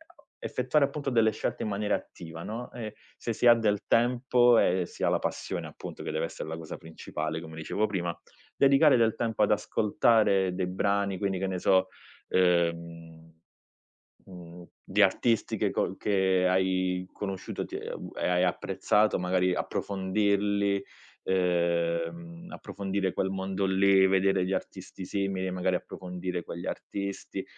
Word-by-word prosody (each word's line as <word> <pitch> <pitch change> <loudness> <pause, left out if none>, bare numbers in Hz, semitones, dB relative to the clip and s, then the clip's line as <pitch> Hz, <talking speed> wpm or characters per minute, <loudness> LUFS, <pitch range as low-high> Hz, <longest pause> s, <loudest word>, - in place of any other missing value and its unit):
o - - -26
effettuare 140 +3 +1
appunto 140 0 -4
delle 115 -3 +3
scelte 110 - -3
in - - -2
maniera 105 +1 0
attiva, 80 0 -8
no, 115 +3 -6
e 110 -3 -7 0.2
se 115 - -3
si 120 - +2
ha 120 - +10
del 105 -3 +1
tempo 120 0 +4
e 90 0 +2
si - - -8
ha - - +3
la - - +1
passione - - -4
appunto, - - -9
che - - -4
deve 80 - -1
essere 80 - -7
la 80 - -4
cosa 80 -1 -7
principale 80 0 -5
come 80 -1 -10
dicevo 100 +7 -1
prima, 90 -5 -3 0.4
dedicare 140 +1 +5
del 115 -2 +3
tempo 115 -2 0
ad 105 - +2
ascoltare 105 -2 +2
dei 90 -1 -1
brani 100 +1 0
quindi 95 -1 -1
che 95 - -1
ne 95 -1 -3
so, 95 +1 +3 0.4
ehm, 85 -2 0 0.9
mhmm, 90 -2 -11 0.2
di 105 +2 +1
artisti 110 +3 +2
che - - +1
co - - -1
che 95 -2 +2
hai 95 0 +1
conosciuto 95 -2 -5
ti - - -6
e - - -7
a - - -4
u - - -9
e - - -1
hai 90 0 +3
apprezzato. 105 +4 +1
Magari 90 0 +1
approfondirli, 100 +1 0 0.4
ehm, 90 - -1
approfondire 95 - -3
quel 95 - -1
mondo 95 0 -2
lì, 95 0 +4
vedere 95 0 +2
gli 95 - -2
artisti 95 0 -5
simili, 95 -1 -2
magari 90 0 0
approfondire 90 -1 -5
quegli 85 +1 -7
artisti, 100 -1 -5
95 Hz, 155 wpm, -28 LUFS, 90-105 Hz, 0.9 s, ha